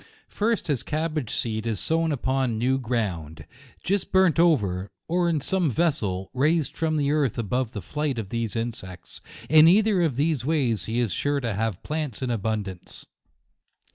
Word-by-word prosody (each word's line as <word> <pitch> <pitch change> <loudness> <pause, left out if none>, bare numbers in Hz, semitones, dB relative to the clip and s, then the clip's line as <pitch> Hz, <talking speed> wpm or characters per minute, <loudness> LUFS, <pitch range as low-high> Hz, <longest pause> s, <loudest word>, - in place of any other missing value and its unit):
First, 225 +2 0
his 145 -7 -1
cab 155 +1 -2
bage 145 -8 -2
seed 110 -1 -2
is 110 -4 -1
sown 165 0 +1
upon 130 -3 0
new 130 +4 +1
ground, 100 - -3 0.4
just 195 +1 -1
burnt 190 -4 +4
over, 105 - +2 0.2
or 175 +1 +1
in 160 -3 +1
some 180 +3 +1
vessel, 110 - -1
raised 150 +3 +1
from 160 -1 0
the 145 -1 +1
earth, 145 -6 +1
above 120 +2 -1
the 105 - -6
flight 150 -3 -2
of 105 -4 -4
these 115 -2 -3
insects; 110 -6 -6 0.3
in 155 +1 +7
either 200 +1 +4
of 160 -7 +1
these 145 -2 0
ways 130 - 0
he 115 +2 -2
is 120 -5 0
sure 145 +9 0
to 115 -4 -2
have 105 -2 -2
plants 150 -5 -4
in 125 - -1
abundance. 105 -4 -4
130 Hz, 170 wpm, -25 LUFS, 110-160 Hz, 0.4 s, in